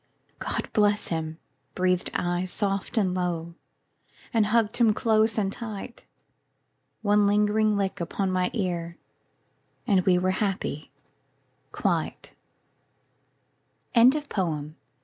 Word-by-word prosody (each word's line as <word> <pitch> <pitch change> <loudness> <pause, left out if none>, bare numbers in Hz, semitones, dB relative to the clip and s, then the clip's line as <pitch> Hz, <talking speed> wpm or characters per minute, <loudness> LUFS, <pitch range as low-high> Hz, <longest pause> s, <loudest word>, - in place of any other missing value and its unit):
"God - - -3
bless 210 -1 +2
him," 160 -1 -3 0.4
breathed 180 -1 +1
I 175 +1 0
soft 195 +3 -2
and 190 -4 +2
low, 170 -2 -2 0.8
And 220 -3 +3
hugged 225 +1 +2
him 225 -3 +4
close 220 -1 +2
and 195 -2 +1
tight. 225 +1 -7 1.0
One 205 -1 +4
lingering 210 +1 +2
lick 195 -2 -2
upon 185 +3 -1
my 185 -1 +1
ear 170 -5 -3 0.9
And 190 -3 +3
we 180 -1 +4
were 185 +1 +1
happy 190 -6 -2 0.8
quite. - - -2 1.6
ANONYMOUS. 205 - +2
195 Hz, 105 wpm, -26 LUFS, 180-215 Hz, 1.6 s, him